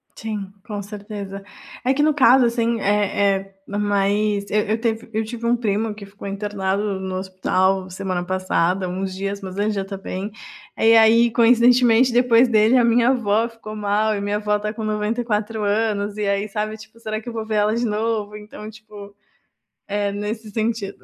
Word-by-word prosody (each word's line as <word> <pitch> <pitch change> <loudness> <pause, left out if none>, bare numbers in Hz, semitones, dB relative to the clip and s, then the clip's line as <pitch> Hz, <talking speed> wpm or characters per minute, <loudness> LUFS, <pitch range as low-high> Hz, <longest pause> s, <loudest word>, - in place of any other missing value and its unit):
Sim, 210 -3 -5
com 210 -2 -5
certeza. 200 -1 -7 0.4
É 255 - +2
que 290 - +1
no 305 0 +3
caso, 260 -2 +5
assim, 235 -1 0
eh, 200 -1 +2
eh, 195 0 -13
mas 205 0 0
eu 210 - +3
eu 220 - +2
teve 225 -1 -2
eu 220 0 -1
tive 235 +1 -6
um 240 - +4
primo 215 -1 -1
que 205 -1 -10
ficou 200 0 -10
internado 200 0 -2
no 200 -2 -2
no 190 -1 -4
hospital 190 0 0
semana 185 -1 -3
passada, 185 0 0
uns 190 +1 -3
dias. 200 +1 -4
Mas 190 -1 -7
ele 210 +1 +1
já 200 -2 -2
tá 195 0 -7
bem. 195 +2 -5 0.5
E 225 +1 +5
aí, 230 +1 +6
coincidentemente, 240 +1 +5
depois 245 0 +5
dele, 220 +2 +4
a 245 - +4
minha 235 +1 +4
avó 230 -2 +1
ficou 220 -2 -10
mal 210 +1 +1
e 200 - -3
minha 205 +1 -1
avó 210 0 0
está 210 +1 -3
com 220 +1 -6
94 215 0 -1
anos 205 -1 0
e 210 -1 -1
aí 200 +1 0
sabe, 215 +1 -3
tipo: 220 +1 -15
"Será 215 -1 -4
que 220 - -16
eu 240 - -5
vou 220 -1 -4
ver 220 0 -3
ela 210 +1 +2
de 240 +1 0
novo?". 215 -1 -2
Então, 210 0 -10
tipo, 210 -2 -12 0.7
é 205 0 -1
nesse 210 +2 -5
sentido. 220 -2 -2
210 Hz, 190 wpm, -21 LUFS, 200-225 Hz, 0.7 s, aí